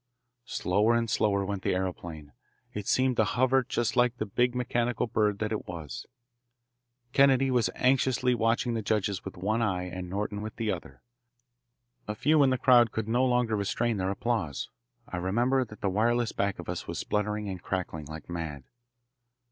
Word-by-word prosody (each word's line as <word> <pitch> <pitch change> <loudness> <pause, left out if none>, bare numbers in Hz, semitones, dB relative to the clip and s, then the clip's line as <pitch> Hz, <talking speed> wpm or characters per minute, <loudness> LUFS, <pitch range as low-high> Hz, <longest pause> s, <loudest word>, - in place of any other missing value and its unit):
Slower 105 +6 +2
and 115 0 +1
slower 100 -2 +1
went 100 -1 -3
the - - 0
aeroplane. 85 -5 -4 0.4
It 105 -1 -5
seemed 130 -1 +2
to - - +5
hover 130 +4 +3
just 120 -1 -1
like 125 0 +3
the 110 - -2
big 120 +4 +1
mechanical 120 -1 0
bird 105 -3 +1
that 110 +1 -2
it 110 - -3
was. 80 -7 -7 1.1
Kennedy 135 -1 +5
was 120 -7 +2
anxiously 130 -1 +2
watching 115 +1 +1
the 115 - -1
judges 100 -2 -1
with 95 - -8
one 105 +6 0
eye 95 -5 0
and 90 0 -6
Norton 105 +2 -3
with 110 0 -6
the 110 -2 -1
other. 65 -8 -7 1.0
A 105 - -3
few 150 +7 +3
in 135 - +5
the 130 - +1
crowd 120 -3 +5
could 110 -1 -3
no 120 +3 +2
longer 125 -3 +2
restrain 105 +3 0
their 95 0 -1
applause. 100 - -2 0.4
I 90 - -5
remember 120 +9 +1
that 105 -2 -13
the 100 - 0
wireless 115 +3 +2
back 100 -1 -1
of - - -8
us - - -4
was - - -4
spluttering 105 0 -1
and 95 -3 -5
crackling 85 -5 -3
like 80 +1 -9
mad. 80 -5 -5
105 Hz, 180 wpm, -28 LUFS, 95-120 Hz, 1.1 s, to